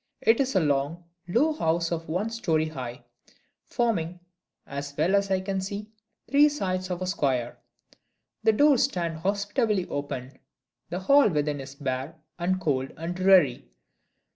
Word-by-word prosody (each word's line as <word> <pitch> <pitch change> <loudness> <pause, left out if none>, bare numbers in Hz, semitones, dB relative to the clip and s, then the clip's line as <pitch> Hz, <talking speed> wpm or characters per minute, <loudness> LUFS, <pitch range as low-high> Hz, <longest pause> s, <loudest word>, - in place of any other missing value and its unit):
It 225 - +4
is 270 -4 0
a - - +6
long, 150 +2 0 0.2
low 270 - +2
house 165 - 0
of 165 -2 -3
one 195 +7 -1
story 160 -8 0
high; 125 -5 -7 0.6
forming 180 -8 -1 0.5
(as 140 0 -6
well 165 +6 +2
as 200 0 +2
I 190 -1 +1
can 190 0 -2
see) 205 +3 -6 0.4
three 290 +2 +5
sides 185 -9 -2
of 180 0 -3
a - - -1
square. 130 -9 -1 0.8
The 220 0 +4
door 285 +2 +5
stands 170 -10 -1
hospitably 205 +1 0
open. 140 -2 -5 0.5
The 180 +2 -3
hall 275 +4 +5
within 150 -3 -1
is 135 +1 -10
bare 135 +2 -3 0.2
and 185 +2 0
cold 135 -6 -1
and 165 +3 -4
dreary. 185 -9 +4
175 Hz, 150 wpm, -26 LUFS, 145-200 Hz, 0.8 s, a